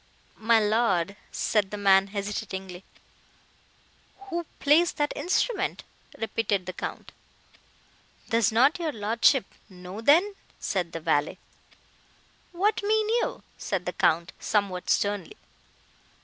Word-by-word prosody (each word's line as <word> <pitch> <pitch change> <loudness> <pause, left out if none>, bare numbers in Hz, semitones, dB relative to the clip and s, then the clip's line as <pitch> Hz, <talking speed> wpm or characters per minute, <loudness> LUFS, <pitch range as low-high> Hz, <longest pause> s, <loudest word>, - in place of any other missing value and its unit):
"My 225 +1 +4
lord!" 205 -4 +1 0.2
said 210 -3 0
the 210 - -5
man, 195 -1 +4
hesitatingly. 195 -2 -5 1.5
"Who 340 0 -2
plays 315 +4 +4
that 295 0 -1
instrument?" 380 +2 -1 0.3
repeated 215 -4 -1
the 185 - -5
Count. - - -6 1.2
"Does 230 -2 +2
not 265 +10 +3
your 325 -3 -1
lordship 230 +5 +2 0.2
know, 185 +2 -9
then?" 340 - +4 0.3
said 180 -4 -2
the 165 - -4
valet. 145 -1 0 1.1
"What 400 +5 +1
mean 430 +1 +1
you?" 470 +1 -1 0.2
said 185 -3 -3
the 180 - -3
Count, 170 +2 +1
somewhat 200 -4 -1
sternly. 205 - 0
215 Hz, 110 wpm, -26 LUFS, 190-300 Hz, 1.5 s, My